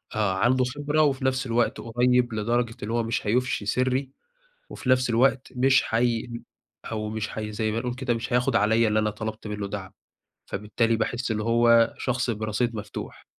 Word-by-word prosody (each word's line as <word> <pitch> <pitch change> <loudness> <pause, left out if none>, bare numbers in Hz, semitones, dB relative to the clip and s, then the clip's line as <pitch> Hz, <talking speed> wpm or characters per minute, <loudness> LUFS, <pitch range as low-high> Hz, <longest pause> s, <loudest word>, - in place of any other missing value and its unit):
آآ، 105 -3 +1
عنده 120 +7 +2
خبرة 145 +4 0
وفي 135 -3 +1
نفس 130 0 +1
الوقت 120 0 0
قريب 120 +1 +2
لدرجة 115 +2 0
اللي 110 +2 -3
هو 120 -1 +1
مش 115 -1 -2
هيُفشي 120 -1 0
سِرّي، 130 +4 0 0.6
وفي - - -7
نَفس 125 -1 +3
الوقت 130 +3 +2
مش 130 +1 +4
حيم 115 0 -1 0.4
أو 110 -1 -4
مش 110 0 -3
حي 105 -1 -5
زي 110 0 -1
ما 115 - -1
نقول 125 0 -3
كده 125 -1 -1
مش 115 +1 -5
هياخد 125 0 +2
عليَّ 110 +1 +3
اللي 105 0 +2
أنا 105 0 +1
طلبت 110 +1 -6
منّه 105 -1 -4
دَعم، 95 -2 -6 0.5
فبالتالي 115 +2 0
باحس 120 +2 -2
اللي 110 -1 -1
هو 115 0 +4
شخص 125 -1 -1
برصيد 110 +2 -1
مفتوح. 105 -1 -7
115 Hz, 180 wpm, -25 LUFS, 110-125 Hz, 0.6 s, مش